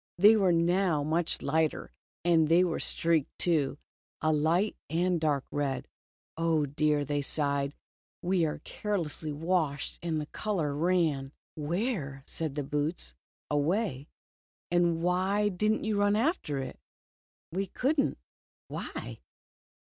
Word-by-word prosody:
They 210 +5 +8
were 195 -4 +4
now 170 -2 +2
much 160 +3 0
lighter, 155 +2 0 0.3
and 165 -3 +4
they 170 +2 +6
were 175 -3 -1
streaked 165 -4 0
too, 150 -6 +1 0.4
a 155 0 +2
light 165 +7 +2
and 175 +1 +1
dark 145 -4 +1
red. 140 -2 -2 0.5
"Oh, 165 -2 +2
dear," 150 +1 +1
they 145 +1 0
sighed, 140 0 +1 0.4
"we 180 -1 +1
were 150 - -5
carelessly 165 -7 -3
washed, 155 -2 -1
and 165 -2 -1
the 150 - -3
color 165 -4 -2
ran." 155 -5 +1 0.2
"Where?" 155 - -2
said 155 -4 -4
the 145 - -1
boots. 145 - -2 0.4
"Away." 150 - 0 0.3
" - - -69
And 170 -1 +2
why 190 +4 +2
did 210 +3 +1
n't 220 - -1
you 215 -2 +1
run 205 0 +3
after 230 - 0
it? 135 -1 -5 0.4
" - - -92
"We 190 +3 -1
could 280 - 0
n't." - - -1 0.5
"Why?" - - -6
165 Hz, 140 wpm, -30 LUFS, 145-185 Hz, 0.5 s, They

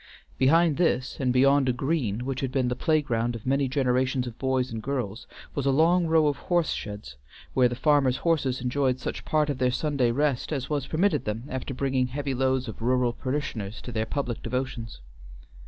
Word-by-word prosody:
Behind 160 +4 +4
this, 145 -7 +1
and 130 -2 +1
beyond 135 +1 +4
a - - +2
green 125 -5 -1
which 135 -1 -3
had 135 -2 -2
been 130 -2 +1
the 125 - -1
playground 120 -6 0
of 115 - -9
many 135 +1 +1
generations 130 -1 +1
of 120 -2 -8
boys 130 -1 0
and 110 -1 -4
girls, 120 -5 -4 0.3
was 140 -1 -2
a - - +5
long 165 +5 +3
row 160 -1 +4
of 145 -2 +1
horse 175 -2 0
sheds, 105 -11 -6 0.4
where 125 -1 +5
the 120 - -4
farmers' 140 -2 +3
horses 135 -7 +1
enjoyed 130 0 0
such - - -5
part 155 -1 +2
of 145 -3 -3
their 125 0 +3
Sunday 140 -2 0
rest 140 +2 0
as 140 -1 -3
was 145 -3 -1
permitted 185 +6 +1
them 105 +2 -3
after 130 0 -4
bringing 130 -1 0
heavy 140 +1 -3
loads 130 0 0
of 110 - -8
rural 125 0 +2
parishioners 130 -7 -4
to 125 - -8
their 110 -1 -2
public 125 -5 -3
devotions. 125 - -4
130 Hz, 195 wpm, -26 LUFS, 125-145 Hz, 0.4 s, a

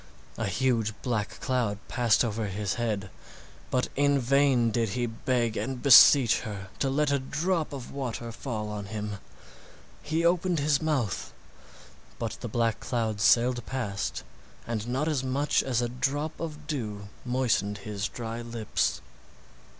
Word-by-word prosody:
A 110 - 0
huge 110 0 0
black 115 -5 -2
cloud 120 -6 0
passed 120 -1 +3
over 110 -1 -2
his 100 0 -2
head, 105 -5 -2 0.6
but 125 - +1
in 145 0 +3
vain 130 -2 +3
did 115 0 0
he 120 - +1
beg 120 0 -1
and 130 -2 -3
beseech 135 -3 +8
her 100 -3 -6
to 135 - +1
let 145 +2 +1
a 140 - +2
drop 165 +5 -1
of 135 -4 -7
water 120 -4 -4
fall 110 -3 -4
on 105 -1 -5
him. 105 0 -4 0.8
He 160 +3 -1
opened 175 0 +2
his 145 -1 +2
mouth, 140 - -1 0.9
but - - -3
the - - -4
black 115 0 0
cloud 110 -4 -2
sailed 120 +2 +4
past 105 - -3 0.4
and 115 -1 -3
not 130 +5 -1
as 145 -5 0
much 135 +3 +1
as 125 -2 0
a 120 - -1
drop 145 +5 -2
of 155 -2 -6
dew 105 -9 -4
moistened 120 -5 0
his 105 -1 -2
dry 115 0 -5
lips. 115 -2 -1
120 Hz, 150 wpm, -28 LUFS, 110-140 Hz, 0.9 s, beseech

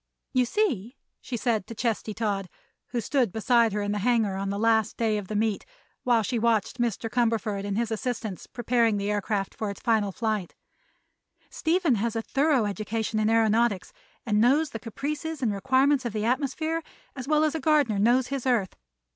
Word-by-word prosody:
"You 255 -1 +3
see," 255 - -1 0.2
she 245 - -4
said 225 -5 0
to 230 - -8
Chesty 220 -2 -2
Todd, 200 -4 -2 0.4
who 245 - -2
stood 245 -1 +1
beside 230 +1 +3
her 210 0 -1
in 205 - -1
the 205 - -1
hangar 220 -3 +1
on 195 +1 -3
the 200 - -2
last 220 0 +2
day 220 -2 +1
of 195 - -8
the 215 - -4
meet 215 -1 0 0.4
while 235 -3 +2
she 240 +3 -1
watched 230 +1 +1
Mr. 230 -1 -1
Cumberford 225 -4 0
and 200 0 -2
his 230 -1 -1
assistants 220 -3 -4
preparing 235 -2 +1
the 200 +1 -1
aircraft 205 -1 -1
for 215 - -3
its 200 - -7
final 215 -4 +1
flight, 215 -3 -2 1.0
"Stephen 330 -2 +1
has 230 0 -1
a 225 - -1
thorough 275 -3 +2
education 215 +2 -2
in 215 - +2
aëronautics 225 -2 +2 0.3
and 210 -2 +2
knows 285 +6 +3
the 225 - -5
caprices 295 +6 -4
and 220 -4 +1
requirements 265 +7 +2
of 240 -3 -3
the 215 0 -1
atmosphere 300 +6 0 0.3
as 260 -1 -6
well 305 0 +3
as 310 -1 +1
a 320 - -2
gardener 285 -8 +2
knows 245 +4 +3
his 270 -2 -3
earth. 225 -7 +1
230 Hz, 190 wpm, -26 LUFS, 210-255 Hz, 1.0 s, You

